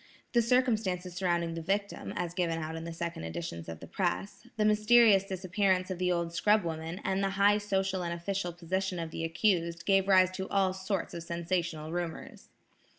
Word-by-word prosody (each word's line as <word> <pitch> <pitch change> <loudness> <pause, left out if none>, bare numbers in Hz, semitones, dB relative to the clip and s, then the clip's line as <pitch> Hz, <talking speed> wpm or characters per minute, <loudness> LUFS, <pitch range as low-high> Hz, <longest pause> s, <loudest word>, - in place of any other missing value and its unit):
The 240 - +5
circumstances 220 -7 +1
surrounding 170 -2 0
the 165 - -4
victim, 200 +4 -2
as 175 -1 -3
given 175 -2 0
out 160 0 -4
in 165 0 -6
the 170 - -5
second 165 - -5
editions 85 0 -5
of 80 -1 -8
the - - -7
press, 90 +3 -3
the 210 - +2
mysterious 215 -1 +6
disappearance 190 0 0
of 180 - -4
the 180 0 +1
old 170 -1 -1
scrub 210 +4 +3
woman 165 +2 -4
and 190 +1 0
the 195 - +2
high 200 +2 +4
social 195 -2 -1
and 170 -1 -3
official 175 +1 -2
position 185 +2 -2
of 165 -1 -4
the 165 - -4
accused, 170 -1 0
gave 195 -1 +3
rise 185 -1 +5
to 190 0 -5
all 190 -2 +2
sorts 190 0 -3
of 170 - -5
sensational 170 -2 -3
rumors. 175 -1 -5
180 Hz, 190 wpm, -30 LUFS, 170-195 Hz, -, mysterious